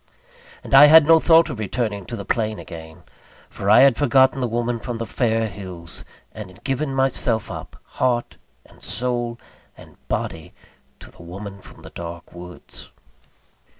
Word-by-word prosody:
And -, -, -8 dB
I 145 Hz, +2 st, +10 dB
had 160 Hz, 0 st, +8 dB
no 165 Hz, +1 st, +6 dB
thought 165 Hz, 0 st, +4 dB
of 120 Hz, -, -7 dB
returning 105 Hz, -2 st, -3 dB
to 120 Hz, -, -5 dB
the 100 Hz, -3 st, -7 dB
plain 110 Hz, 0 st, -1 dB
again; 80 Hz, -2 st, -11 dB, 0.5 s
for 100 Hz, -, -4 dB
I 110 Hz, +4 st, +7 dB
had 135 Hz, -3 st, +5 dB
forgotten 130 Hz, -1 st, +3 dB
the 125 Hz, -, 0 dB
woman 120 Hz, +1 st, -2 dB
from 120 Hz, +1 st, -5 dB
the 115 Hz, -, -4 dB
fair 115 Hz, -2 st, 0 dB
hills, 90 Hz, -4 st, -9 dB, 0.3 s
and 105 Hz, -3 st, -8 dB
had 90 Hz, -, -18 dB
given 135 Hz, +1 st, -2 dB
myself 125 Hz, -4 st, 0 dB
up, -, -, -9 dB
heart, 120 Hz, -2 st, -2 dB, 0.3 s
and -, -, -21 dB
soul, 120 Hz, -1 st, -3 dB, 0.4 s
and -, -, -16 dB
body, 80 Hz, -1 st, -4 dB, 0.5 s
to -, -, -13 dB
the -, -, -17 dB
woman 100 Hz, +3 st, -9 dB
from -, -, -16 dB
the -, -, -12 dB
dark 85 Hz, 0 st, -9 dB
woods. 90 Hz, 0 st, -11 dB
115 Hz, 165 wpm, -21 LUFS, 100-130 Hz, 0.5 s, I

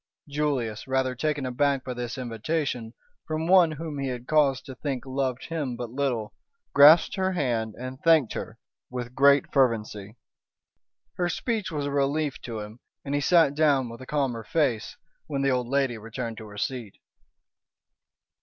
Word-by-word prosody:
Julius, 140 Hz, -7 st, -2 dB
rather 130 Hz, -1 st, +1 dB
taken 145 Hz, +1 st, -1 dB
aback 135 Hz, +1 st, +1 dB
by 130 Hz, -, -4 dB
this 120 Hz, 0 st, -5 dB
invitation 125 Hz, 0 st, -3 dB, 0.3 s
from 155 Hz, 0 st, -2 dB
one 175 Hz, -2 st, +5 dB
whom 155 Hz, -1 st, -6 dB
he 135 Hz, -, -2 dB
had 125 Hz, -1 st, -5 dB
cause 145 Hz, -3 st, +3 dB
to 135 Hz, -, -9 dB
think 130 Hz, -2 st, -4 dB
loved 130 Hz, -2 st, -2 dB
him 150 Hz, -7 st, -2 dB
but 120 Hz, -1 st, -6 dB
little, 125 Hz, -5 st, -2 dB, 0.4 s
grasped 150 Hz, +7 st, +7 dB
her 190 Hz, 0 st, +1 dB
hand 115 Hz, -, -1 dB
and 130 Hz, +1 st, -7 dB
thanked 160 Hz, -8 st, +4 dB
her -, -, -6 dB, 0.3 s
with 125 Hz, -1 st, -5 dB
great 140 Hz, +1 st, +4 dB
fervency. 110 Hz, -5 st, 0 dB, 1.0 s
Her 175 Hz, -1 st, +1 dB
speech 220 Hz, +3 st, -2 dB
was 145 Hz, -2 st, -2 dB
a 145 Hz, -, -2 dB
relief 140 Hz, +1 st, 0 dB
to 115 Hz, -3 st, -5 dB
him, 105 Hz, +3 st, -10 dB, 0.3 s
and 140 Hz, -, -3 dB
he 145 Hz, -, +1 dB
sat 165 Hz, -2 st, +4 dB
down 145 Hz, -4 st, +2 dB
with 115 Hz, +2 st, -10 dB
a 130 Hz, -, -10 dB
calmer 135 Hz, -6 st, -1 dB
face, 125 Hz, -5 st, -1 dB, 0.3 s
when 140 Hz, -2 st, -2 dB
the 135 Hz, -, +3 dB
old 125 Hz, -1 st, 0 dB
lady 135 Hz, -3 st, 0 dB
returned 115 Hz, +1 st, -6 dB
to 110 Hz, -, -9 dB
her 105 Hz, 0 st, -11 dB
seat. 120 Hz, -2 st, -4 dB
135 Hz, 165 wpm, -26 LUFS, 120-150 Hz, 1.0 s, grasped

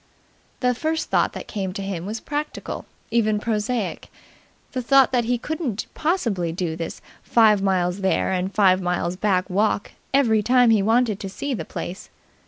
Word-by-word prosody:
The 250 Hz, -1 st, +3 dB
first 315 Hz, +5 st, -2 dB
thought -, -, +2 dB
that -, -, -7 dB
came 190 Hz, -3 st, -3 dB
to 195 Hz, -, -5 dB
him 190 Hz, -2 st, -4 dB
was 220 Hz, +2 st, -4 dB
practical, 295 Hz, +4 st, -5 dB, 0.2 s
even 215 Hz, -2 st, +2 dB
prosaic 215 Hz, -1 st, -2 dB, 0.6 s
the 255 Hz, -, -2 dB
thought 270 Hz, +2 st, +5 dB
that 245 Hz, -2 st, +1 dB
he 245 Hz, +1 st, +1 dB
couldn't 270 Hz, -, -3 dB
possibly 230 Hz, -, 0 dB
do 165 Hz, -1 st, -2 dB
this 165 Hz, 0 st, -6 dB, 0.2 s
five 215 Hz, -3 st, +4 dB
miles 185 Hz, -1 st, +1 dB
there 190 Hz, 0 st, +1 dB
and 185 Hz, +1 st, -1 dB
five 190 Hz, -3 st, +4 dB
miles 180 Hz, 0 st, -1 dB
back 185 Hz, -2 st, +1 dB
walk, 205 Hz, +2 st, 0 dB, 0.2 s
every 235 Hz, -6 st, +3 dB
time 245 Hz, +1 st, +4 dB
he 215 Hz, -3 st, +4 dB
wanted 225 Hz, 0 st, +2 dB
to 195 Hz, -, -5 dB
see 275 Hz, +8 st, -4 dB
the 235 Hz, -, -4 dB
place. 180 Hz, +3 st, -6 dB
210 Hz, 170 wpm, -23 LUFS, 190-245 Hz, 0.6 s, thought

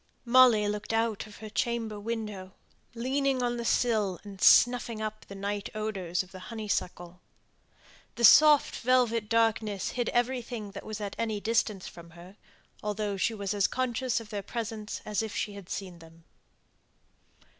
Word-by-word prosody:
Molly 235 Hz, -4 st, +6 dB
looked 210 Hz, +1 st, -3 dB
out 225 Hz, -2 st, 0 dB
of 210 Hz, -, -13 dB
her 220 Hz, -, -9 dB
chamber 225 Hz, -3 st, -2 dB
window 210 Hz, -4 st, -5 dB, 0.4 s
leaning 265 Hz, +2 st, 0 dB
on 240 Hz, 0 st, -1 dB
the 235 Hz, -, -3 dB
sill, 215 Hz, -6 st, +1 dB
and 200 Hz, -2 st, -11 dB
snuffing 240 Hz, -2 st, +5 dB
up 215 Hz, 0 st, -5 dB
the 200 Hz, -, -9 dB
night 200 Hz, +1 st, -3 dB
odours 190 Hz, -5 st, -2 dB
of 185 Hz, -, -18 dB
the 185 Hz, -, -10 dB
honeysuckle. 180 Hz, -5 st, -4 dB, 0.9 s
The 235 Hz, -, -4 dB
soft 300 Hz, +5 st, +7 dB
velvet 235 Hz, -3 st, +2 dB
darkness 220 Hz, -3 st, +1 dB
hid 245 Hz, -1 st, -2 dB
everything 240 Hz, -3 st, -2 dB
that 200 Hz, -, -9 dB
was 215 Hz, -1 st, -5 dB
at 200 Hz, -1 st, -4 dB
any 220 Hz, -2 st, -1 dB
distance 215 Hz, -3 st, 0 dB
from 170 Hz, -1 st, -12 dB
her; 180 Hz, +3 st, -13 dB, 0.5 s
although 210 Hz, -1 st, -2 dB
she 195 Hz, +4 st, 0 dB
was 200 Hz, -1 st, -3 dB
as 205 Hz, -1 st, +2 dB
conscious 255 Hz, -1 st, -1 dB
of 225 Hz, -1 st, -12 dB
their 205 Hz, -1 st, -3 dB
presence 220 Hz, -1 st, -5 dB
as 210 Hz, 0 st, -1 dB
if 220 Hz, -2 st, -5 dB
she 205 Hz, -, -2 dB
had 200 Hz, -3 st, -11 dB
seen 185 Hz, -3 st, -6 dB
them. 165 Hz, 0 st, -17 dB
215 Hz, 160 wpm, -29 LUFS, 200-235 Hz, 0.9 s, soft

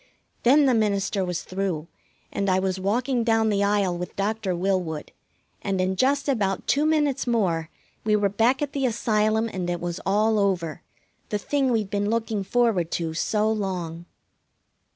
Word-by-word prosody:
Then 280 Hz, +4 st, +5 dB
the 260 Hz, -, +4 dB
minister 200 Hz, -3 st, +1 dB
was 180 Hz, -2 st, -3 dB
through, 185 Hz, -5 st, -3 dB, 0.4 s
and 200 Hz, 0 st, -1 dB
I 185 Hz, -, +3 dB
was 190 Hz, 0 st, -1 dB
walking 240 Hz, +6 st, 0 dB
down 225 Hz, -1 st, +2 dB
the 200 Hz, -1 st, +1 dB
aisle 200 Hz, -3 st, +1 dB
with 180 Hz, +1 st, -6 dB
Doctor 200 Hz, -2 st, -1 dB
Willwood, 180 Hz, -4 st, -1 dB, 0.5 s
and 195 Hz, -2 st, -1 dB
in 185 Hz, +1 st, +1 dB
just 275 Hz, +6 st, +1 dB
about 200 Hz, -8 st, 0 dB
two 295 Hz, +2 st, +2 dB
minutes 295 Hz, -5 st, +1 dB
more 175 Hz, -9 st, +1 dB, 0.3 s
we 215 Hz, -1 st, +2 dB
were 205 Hz, -1 st, +2 dB
back 230 Hz, +8 st, +2 dB
at 285 Hz, -, -4 dB
the 270 Hz, -2 st, +1 dB
Asylum, 220 Hz, -1 st, +1 dB
and 185 Hz, -5 st, -4 dB
it 175 Hz, 0 st, -1 dB
was 175 Hz, +1 st, -4 dB
all 215 Hz, +2 st, +2 dB
over 175 Hz, -5 st, 0 dB, 0.5 s
the 210 Hz, -, 0 dB
thing 270 Hz, +5 st, 0 dB
we'd 215 Hz, -4 st, 0 dB
been 205 Hz, 0 st, 0 dB
looking 225 Hz, -2 st, -1 dB
forward 215 Hz, -6 st, +1 dB
to 165 Hz, -2 st, -2 dB
so 210 Hz, +6 st, 0 dB
long. 180 Hz, -5 st, -3 dB
205 Hz, 170 wpm, -25 LUFS, 185-230 Hz, 0.5 s, Then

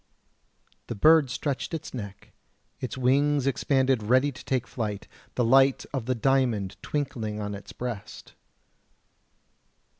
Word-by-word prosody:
The -, -, -4 dB
bird 155 Hz, +4 st, +5 dB
stretched 140 Hz, +5 st, -3 dB
its 160 Hz, -, -7 dB
neck, 100 Hz, -6 st, -8 dB, 0.5 s
its 130 Hz, 0 st, -5 dB
wings 140 Hz, +2 st, +2 dB
expanded 135 Hz, -1 st, +2 dB
ready 130 Hz, +6 st, +3 dB
to 125 Hz, -, -12 dB
take 130 Hz, -2 st, -1 dB
flight, 105 Hz, -4 st, -4 dB, 0.3 s
the 125 Hz, -, +2 dB
light 135 Hz, +3 st, +4 dB
of 130 Hz, -4 st, -3 dB
the 130 Hz, -, +1 dB
diamond 120 Hz, -6 st, +1 dB
twinkling 115 Hz, -8 st, -3 dB
on 105 Hz, -1 st, -4 dB
its 100 Hz, 0 st, -9 dB
breast. 115 Hz, -4 st, -7 dB
130 Hz, 125 wpm, -27 LUFS, 110-135 Hz, 0.5 s, bird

